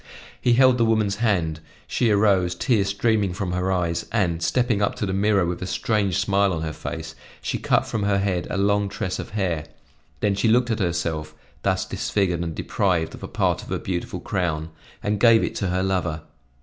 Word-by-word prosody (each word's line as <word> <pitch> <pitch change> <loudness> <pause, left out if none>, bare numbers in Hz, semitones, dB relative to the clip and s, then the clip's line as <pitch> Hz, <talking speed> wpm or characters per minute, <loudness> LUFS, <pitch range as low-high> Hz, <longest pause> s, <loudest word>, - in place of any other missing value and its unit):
He 120 - +3
held 130 0 +5
the - - +4
woman's 110 -3 +1
hand; 90 -9 0 0.3
she 120 - +1
arose, 100 -4 +3
tears 105 -6 +1
streaming 100 -1 +1
from 95 -1 -3
her 90 +1 0
eyes, 85 -2 -1
and, 85 -4 0
stepping 105 +6 +1
up 100 - +1
to - - -2
the 95 - -2
mirror 100 -1 +2
with 85 0 -3
a 90 - -3
strange 100 -3 0
smile 100 0 +2
on 80 -1 -3
her 80 -1 -3
face, 80 0 -6 0.3
she - - -3
cut - - +2
from 110 - -3
her 100 -1 +2
head 95 -3 -1
a - - -2
long 100 0 +2
tress 95 -2 -3
of - - -5
hair; 85 -6 -1 0.5
then 105 - +1
she 100 +4 +1
looked 120 +2 +3
at 110 - -1
herself, 85 -4 -2 0.3
thus - - 0
disfigured 90 -4 -1
and 85 -2 -4
deprived 90 -5 0
of - - -10
a - - -5
part - - 0
of - - -12
her - - -1
beautiful 90 -2 -4
crown, 80 -4 -2 0.3
and 105 0 0
gave 115 -1 +6
it - - -2
to 100 - -1
her 90 +1 0
lover. 90 -5 -1
95 Hz, 205 wpm, -23 LUFS, 85-105 Hz, 0.5 s, gave